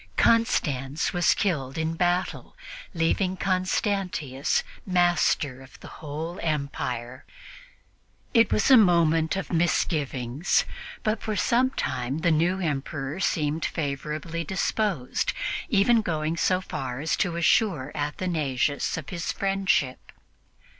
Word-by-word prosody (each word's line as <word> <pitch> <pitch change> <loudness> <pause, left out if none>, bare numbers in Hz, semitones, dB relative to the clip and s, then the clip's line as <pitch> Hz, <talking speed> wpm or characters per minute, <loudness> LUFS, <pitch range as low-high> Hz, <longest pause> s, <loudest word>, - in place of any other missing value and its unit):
Constans 145 - +2
was 175 -1 +3
killed 140 -9 -1
in 160 0 -1
battle, 175 +2 -1 0.4
leaving 180 +3 +1
Constantius 185 - 0 0.2
master 175 -7 +1
of 130 - -15
the - - -11
whole 160 +4 -5
empire. 130 -5 -3 1.1
It 230 -2 +5
was 215 - +2
a 260 - +10
moment 165 -5 +4
for - - -8
misgivings; 150 -4 +1 0.4
but 215 0 0
for 215 -1 -2
some 235 +7 +2
time 130 - -3
the 170 -1 +3
new 170 +4 +2
Emperor 145 -2 -3
seemed 155 -4 0
favorably 155 +3 -3
disposed, 190 - -1 0.4
even 225 +1 +4
going 160 -4 -1
so 185 +2 +1
far 130 -8 -5
as 155 +3 0
to 175 -4 0
assure 170 - +2
Athanasius 145 -3 -1
of - - -7
his 175 -3 -3
friendship. 195 -9 0
165 Hz, 115 wpm, -26 LUFS, 145-185 Hz, 1.1 s, a